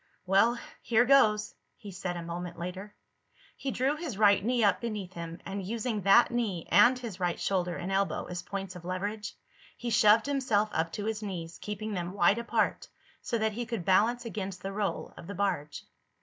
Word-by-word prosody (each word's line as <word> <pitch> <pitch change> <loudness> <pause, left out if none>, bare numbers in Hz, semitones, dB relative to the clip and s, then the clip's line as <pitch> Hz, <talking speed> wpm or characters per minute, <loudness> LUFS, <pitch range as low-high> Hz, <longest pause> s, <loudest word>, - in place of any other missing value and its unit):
"Well, 200 +6 +4 0.2
here 240 +1 +3
goes," 215 -6 +4 0.2
he 205 -4 -10
said 180 -1 -4
a 170 - -5
moment 175 +1 -6
later. 185 +4 -6 0.6
He 275 - -4
drew 265 +3 +1
his 305 - -5
right 205 -2 +5
knee 240 +1 +1
up 205 - +3
beneath 210 -6 -4
him 170 0 -7
and, 195 0 -4
using 225 +2 -2
that 200 +6 +6
knee 215 -8 -2
and 240 +8 +6
his 230 -7 -7
right 175 -2 -1
shoulder 180 -3 0
and 185 +2 -4
elbow 195 0 0
as 180 -1 -5
points 195 0 -6
of 180 - -9
leverage, 205 +4 -4 0.4
he 240 -1 -4
shoved 215 +1 +5
himself 255 -7 +1
up 165 +1 0
to 205 - -4
his 220 -1 -2
knees, 175 -5 -6
keeping 210 +1 -4
them 180 -1 -3
wide 200 +3 +3
apart 235 - 0 0.3
so 235 - -1
that 220 -1 0
he 235 +2 -4
could 230 -7 -4
balance 235 +6 +3
against 195 -5 -5
the 195 0 -4
roll 200 -4 -2
of 170 - -10
the 200 - -6
barge. 165 -7 -2
200 Hz, 190 wpm, -29 LUFS, 180-230 Hz, 0.6 s, that